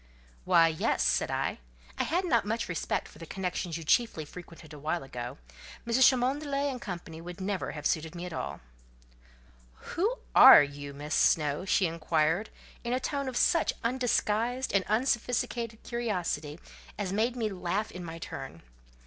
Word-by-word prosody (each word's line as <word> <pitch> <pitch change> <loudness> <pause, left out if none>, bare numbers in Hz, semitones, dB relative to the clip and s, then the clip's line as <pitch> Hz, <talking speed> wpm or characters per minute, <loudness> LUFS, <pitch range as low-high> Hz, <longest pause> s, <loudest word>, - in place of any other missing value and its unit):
"Why, 165 -1 +6
yes," 160 -1 0
said - - +2
I; - - -2 0.4
"I - - +1
had 360 +3 0
not 235 - +3
much 225 +3 -2
respect 175 -3 -2
for - - -16
the 165 - -9
connections 180 -2 -3
you 165 - -7
chiefly 160 -2 +2
frequented 165 -1 -12
awhile 155 +3 -3
ago: 120 -2 -6 0.5
Mrs. 235 +2 +5
Cholmondeley 275 +2 0
and 250 -2 -7
Co. 180 -5 -4 0.2
would 175 +2 -9
never 190 0 -2
have 150 -1 -8
suited 160 +2 0
me 175 +1 -5
at 180 - -6
all." - - -5 1.3
"Who 420 +8 +1 0.2
are - - +10
you, 145 0 -7
Miss 150 +2 -5
Snowe?" 150 +2 +2
she 195 -1 +3
inquired, 165 +3 0 0.3
in 240 0 -2
a 255 - +1
tone 280 0 -2
of 250 - -4
such 335 -2 +3
undisguised 245 0 0
and 195 -1 +3
unsophisticated 235 -1 -1
curiosity, 180 -10 -3 0.4
as 195 -2 -2
made 230 +4 +1
me 225 -3 -1
laugh 190 +3 -2
in 180 - -7
my 165 -1 -7
turn. - - -8
195 Hz, 160 wpm, -29 LUFS, 165-240 Hz, 1.3 s, are